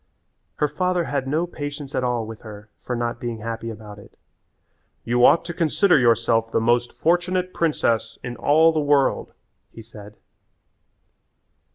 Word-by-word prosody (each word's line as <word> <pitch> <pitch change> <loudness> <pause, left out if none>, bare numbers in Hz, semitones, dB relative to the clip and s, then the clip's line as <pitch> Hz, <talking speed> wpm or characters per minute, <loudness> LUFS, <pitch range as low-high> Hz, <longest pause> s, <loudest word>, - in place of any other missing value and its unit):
Her 150 - +1
father 180 +4 -1
had 140 -4 -3
no 155 +5 0
patience 145 -4 -7
at - - -1
all 120 -2 -1
with 110 0 -10
her 105 -1 -12
for 125 - -4
not 120 0 -3
being 120 -2 -4
happy 115 +1 -5
about 105 -2 -10
it. - - -17 0.9
"You 120 +1 +1
ought 165 - +5
to 170 - -5
consider 170 +1 +3
yourself 115 -1 +2
the - - +1
most 120 +1 +1
fortunate 180 +2 0
princess 115 -8 0
in 125 -1 -5
all 160 +5 +4
the 160 - -1
world," 145 -2 +1 0.4
he 115 - -12
said. 105 -2 -13
125 Hz, 155 wpm, -22 LUFS, 115-155 Hz, 0.9 s, ought